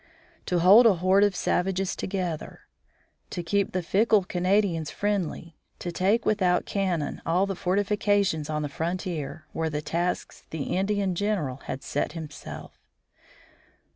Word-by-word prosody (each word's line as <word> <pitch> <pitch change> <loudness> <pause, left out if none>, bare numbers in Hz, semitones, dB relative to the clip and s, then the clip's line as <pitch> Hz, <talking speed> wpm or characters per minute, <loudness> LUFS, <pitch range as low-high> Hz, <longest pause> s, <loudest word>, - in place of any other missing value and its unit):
To 180 - +1
hold 200 +8 +8
a 205 - +5
horde 185 +3 +4
of 205 -2 0
savages 190 +1 0
together, 180 -5 -4 0.7
to 175 - -4
keep 200 +3 0
the 185 -1 -2
fickle 210 +3 +3
Canadians 180 -3 +1
friendly, 180 -4 -3 0.2
to 175 - -5
take 195 +6 +1
without 185 -4 +2
cannon 180 -7 -1
all 180 +4 +2
the 195 - -2
fortifications 200 -3 +1
on 150 -1 -1
the - - -1
frontier, 160 -1 -4
were 160 0 -1
the 150 0 -3
tasks 170 +4 -2
the 155 -3 -3
Indian 195 0 0
general 180 -9 -1
had 135 - -5
set 145 - -2
himself. 160 -3 -8
180 Hz, 140 wpm, -26 LUFS, 165-200 Hz, 0.7 s, hold